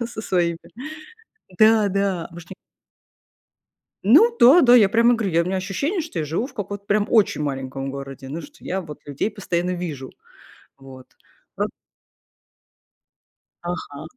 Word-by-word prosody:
да, 235 - -2
со 230 -2 -8
своими. 170 -4 0 1.0
Да, 215 -1 +5
да, 195 -3 -1
может 170 0 -12
не 190 - -9 1.5
Ну 400 - +6
да, 275 +9 +7
да, 245 -2 +7
я 210 -5 +6
прямо 235 +3 +4
говорю, 190 -7 +1
у - - -9
меня 190 - -2
ощущение, 200 - -2
что 305 - -6
я 155 - -2
живу 165 - -2
в 265 - -12
каком-то 200 -2 -6
прям 205 0 +1
очень 210 -8 +3
маленьком 135 -1 -4
городе, 135 -1 -8
ну 155 +5 -5
что 295 0 -14
я 190 +1 -3
вот 150 -3 -10
людей 145 +9 -3
постоянно 180 -3 -2
вижу. 160 -7 -5 0.7
Вот. 130 -1 -13 0.5
Пра - - 0 2.1
Ага. 160 - -8
185 Hz, 150 wpm, -22 LUFS, 155-220 Hz, 2.1 s, да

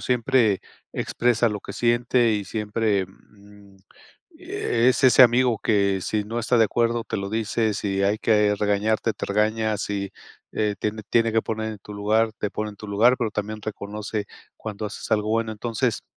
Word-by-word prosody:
Siempre 120 -4 +2 0.3
expresa 120 -1 +1
lo 105 -1 -3
que - - -8
siente 120 0 +2
y 105 -1 -1
siempre, 105 -1 -1
mm, 100 +1 -19 0.6
es 120 +3 +1
ese 130 0 +8
amigo 120 -1 +4
que 100 -3 +2
si 105 +2 -2
no 115 +3 -4
está 120 +1 +1
de 115 - +6
acuerdo, 115 +1 0
te - - -3
lo 100 0 -4
dice, 110 0 0
si 100 -1 -1
hay 100 +2 +2
que 105 -2 +3
regañarte, 105 +2 0
te - - -5
regaña, 110 +1 +1
si, 100 -1 -3 0.4
eh, 105 -1 0
tiene 110 0 -3
tiene 115 -1 +3
que 110 0 +2
poner 110 0 -3
en 105 - -10
tu 105 - -11
lugar, 110 +2 +1
te 105 - -2
pone 105 +1 -4
en 105 - -14
tu 105 - -9
lugar, 115 +5 +4
pero 115 -3 -1
también 105 +1 -4
reconoce 105 0 -5 0.3
cuando 110 -1 -5
haces 105 - -8
algo 105 -1 +1
bueno. 115 0 0
Entonces, 115 +2 -2
110 Hz, 180 wpm, -24 LUFS, 105-115 Hz, 0.6 s, ese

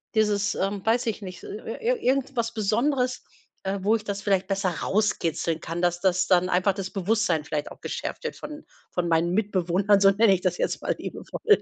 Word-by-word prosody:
dieses, 210 -2 +2
ähm, 195 +1 -2
weiß 235 +1 +2
ich 220 -1 -2
nicht, 185 -2 -8
ir 210 - -8
ir - - -6
ir 485 +2 +1
irgendwas 260 -4 0
Besonderes, 250 +5 0 0.4
äh, 195 +1 -2
wo 210 +4 +3
ich 210 - -12
das 200 -1 -3
vielleicht 195 -2 +1
besser 195 -1 0
rauskitzeln 170 -6 0
kann, 165 +2 -4
dass 175 -1 +1
das 185 0 +2
dann 180 0 +4
einfach 185 +2 +3
das 190 -1 -4
Bewusstsein 195 -5 +1
vielleicht 150 -1 -3
auch - - -13
geschärft - - -5
wird - - -4
von 300 0 -8 0.3
von 175 -1 -1
meinen 165 +1 +2
Mitbewohnern, 195 -1 +2
so 195 0 +6
nenne 205 0 +5
ich 190 - +1
das 180 -1 0
jetzt - - -1
mal - - -1
liebevoll. 425 -2 0
195 Hz, 200 wpm, -26 LUFS, 180-220 Hz, 0.4 s, so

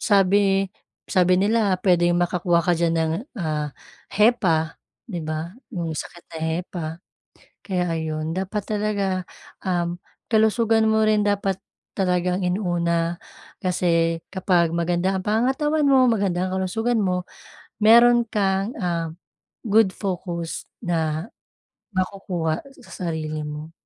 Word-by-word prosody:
sabi 195 -1 +3 0.4
sabi 180 0 +4
nila 205 -1 +2
pwedeng 175 -2 +4
makakuha 175 -1 +2
ka 180 - +3
diyan 165 0 +1
ng, 160 -1 +1 0.3
ah, 155 -4 -2 0.4
hepa, 185 -8 +2 0.3
'di 185 -8 -4
ba? 155 +2 -4 0.2
Yung 165 -3 -3
sakit 170 +3 -7
na - - -4
hepa. 165 +1 -3 0.8
Kaya 185 -3 0 0.2
ayun 155 0 -3
dapat 195 +2 -2
talaga, 200 -3 -1 0.4
um, 175 -1 0 0.3
kalusugan 220 0 +3
mo 220 0 +3
rin 215 -1 +3
dapat 200 -2 0 0.4
talagang 180 -1 +1
inuna, 175 -2 0 0.5
kasi 170 -2 +1
kapag 180 -3 +2
maganda 175 +3 +1
ang 185 - -4
pangangatawan 270 +8 +1
mo, 265 -2 +6
maganda 195 -5 +1
ang 185 0 -2
kalusugan 225 +5 0
mo 180 -2 0 0.6
meron 235 +2 +7
kang, 195 0 0
ah, 170 -5 -1 0.5
good 215 -3 +3
focus 175 -4 -4 0.2
na 160 -2 -1 0.7
makukuha 180 -4 -1 0.2
sa - - -14 0.2
sarili 155 -1 -3
mo. 150 +2 -7
185 Hz, 120 wpm, -23 LUFS, 170-205 Hz, 0.8 s, meron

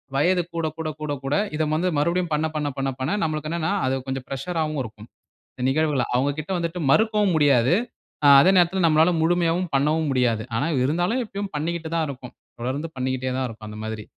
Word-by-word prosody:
வயது 175 +6 +3
கூட, 165 -1 0
கூட, 160 -1 -3
கூட, 150 -1 -2
கூட 135 +2 0 0.2
இத 155 +1 0
வந்து 175 +4 0
மறுபடியும் 170 +2 0
பண்ண, 155 +1 +1
பண்ண, 150 -1 -1
பண்ண, 135 0 -1
பண்ண 135 +9 -1
நம்மளுக்கு 155 -1 -2
என்னன்னா 165 0 -1
அது 130 +1 +1
கொஞ்சம் 135 -1 -4
பிரஷராவும் 155 +2 -2
இருக்கும். 110 0 -11 0.5
இந்த 125 - -6
நிகழ்வுகள 150 -2 +1
அவங்ககிட்ட 145 +6 -1
வந்துட்டு 170 +1 -3
மறுக்கவும் 210 -1 +3
முடியாது. 140 -1 +4 0.5
அ - - +7
அதே 180 - +5
நேரத்தில 180 +1 +3
நம்மளால 160 +3 +4
முழுமையாவும் 175 +1 +1
பண்ணவும் 150 +2 +1
முடியாது. 120 -4 +1
ஆனா 140 - 0 0.2
இருந்தாலும் 175 - 0
இப்பயும் 200 -1 -6
பண்ணிக்கிட்டு 160 +1 -3
தான் 160 -2 +1
இருக்கோம். 125 -2 -10 0.3
தொடர்ந்து 140 +6 -3
பண்ணிக்கிட்டே 130 0 -2
தான் 130 - 0
இருக்கோம். 110 -1 -10
அந்த 105 - -9
மாதிரி. 110 -1 -5
155 Hz, 180 wpm, -23 LUFS, 135-170 Hz, 0.5 s, அ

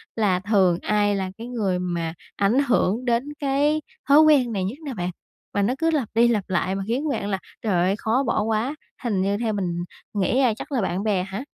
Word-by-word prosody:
là 200 -5 +2
thường 190 -3 +2
ai 205 -1 +2
là 190 -1 -2
cái 230 +2 -7
người 200 -7 -1
mà 170 -2 -2 0.2
ảnh 200 +5 +2
hưởng 240 0 +1
đến 245 +5 0
cái 290 +2 +1 0.3
thói 285 - +8
quen 290 -6 +5
này 190 - -1
nhất 200 +9 -3
nè 270 - -4
bạn? 180 -3 -3 0.4
Và 205 - +1
nó 230 +6 +2
cứ 330 +2 +1
lặp 275 -8 0
đi 230 +2 +5
lặp 220 -5 +1
lại 185 +1 0
mà 195 - -3
khiến 275 +6 -1
bạn 205 -7 -2
là 195 - -1 0.2
trời 215 -4 0
ơi, 180 +3 +2
khó 235 +6 +1
bỏ 225 - +1
quá, 225 +6 -1 0.3
hình 210 -6 0
như 200 +1 +1
theo 225 -2 -1
mình 175 -3 -2 0.3
nghĩ 210 +6 +1
là 240 -4 +3
chắc 295 - -8
là 255 -6 +1
bạn 190 +1 -1
bè 200 -4 +1
hả? 195 +6 -5
210 Hz, 230 wpm, -24 LUFS, 190-250 Hz, 0.4 s, thói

